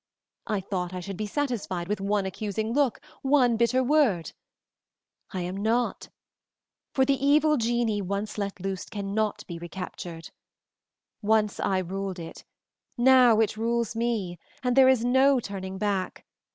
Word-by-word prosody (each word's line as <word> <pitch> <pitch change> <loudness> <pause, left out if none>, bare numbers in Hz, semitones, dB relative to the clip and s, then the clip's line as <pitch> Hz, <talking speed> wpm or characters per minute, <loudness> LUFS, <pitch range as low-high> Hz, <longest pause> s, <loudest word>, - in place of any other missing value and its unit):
I 210 -4 -1
thought 185 -2 -3
I - - -3
should 195 +2 -6
be 210 +3 -3
satisfied 210 -9 -2
with 210 0 -2
one 200 0 0
accusing 215 +3 -3
look, 275 -4 +2 0.2
one 265 -4 +3
bitter 235 +3 +2
word; 250 - +2 1.0
I 185 - -4
am 180 +2 -4
not, 225 +4 0 0.8
for 265 - +2
the 275 -1 0
evil 300 +2 +4
genii 230 -4 0
once 200 +3 -3
let 200 -1 -3
loose 190 0 -4
cannot 205 +1 -2
be 170 -2 -7
recaptured. 170 -1 -7 0.9
Once 210 -1 +2
I 190 - +1
ruled 190 +1 -3
it, 165 -1 -9 0.5
now 245 -2 +6
it 215 0 0
rules 230 0 -1
me, 220 -7 -2 0.2
and 250 -1 +1
there 265 -1 +7
is 250 -3 +3
no 265 +2 +4
turning 190 -3 -6
back. 195 -2 -2
215 Hz, 145 wpm, -27 LUFS, 190-245 Hz, 1.0 s, there